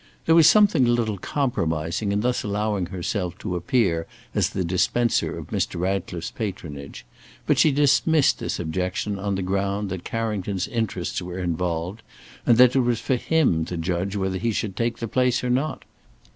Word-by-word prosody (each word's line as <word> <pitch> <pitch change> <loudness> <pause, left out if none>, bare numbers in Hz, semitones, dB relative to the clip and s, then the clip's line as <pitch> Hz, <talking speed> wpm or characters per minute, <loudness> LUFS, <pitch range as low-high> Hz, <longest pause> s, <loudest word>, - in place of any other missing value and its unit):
There 160 - +4
was 165 -1 +8
something 195 - +5
a - - +2
little 115 -4 0
compromising 90 - -1
in 100 +1 +1
thus 125 +2 0
allowing 105 -2 -1
herself 90 0 -3
to 90 -4 -4
appear 90 -5 +1 0.3
as - - +1
the 95 - -2
dispenser 100 +7 +1
of - - -8
Mr. - - -1
Ratcliffe's 90 -2 -2
patronage, 80 - -6 0.4
but - - +2
she 155 - +5
dismissed 145 +2 +3
this - - -3
objection 90 +4 -2
on 100 0 -1
the 95 - -2
ground 100 +2 -1
that 95 -2 -5
Carrington's 105 -5 -2
interests 110 -8 -2
were 90 0 -6
involved, 90 +2 -2 0.5
and 120 - +5
that 125 +1 +6
it - - +5
was 120 -2 +1
for 130 - 0
him 125 - +2
to 90 - -5
judge 90 +4 -2
whether 95 -1 -1
he 115 +3 0
should 105 -2 -3
take 115 +2 -1
the 115 - -4
place 125 +2 +1
or 125 - 0
not. 135 +5 -1
100 Hz, 175 wpm, -24 LUFS, 90-120 Hz, 0.5 s, was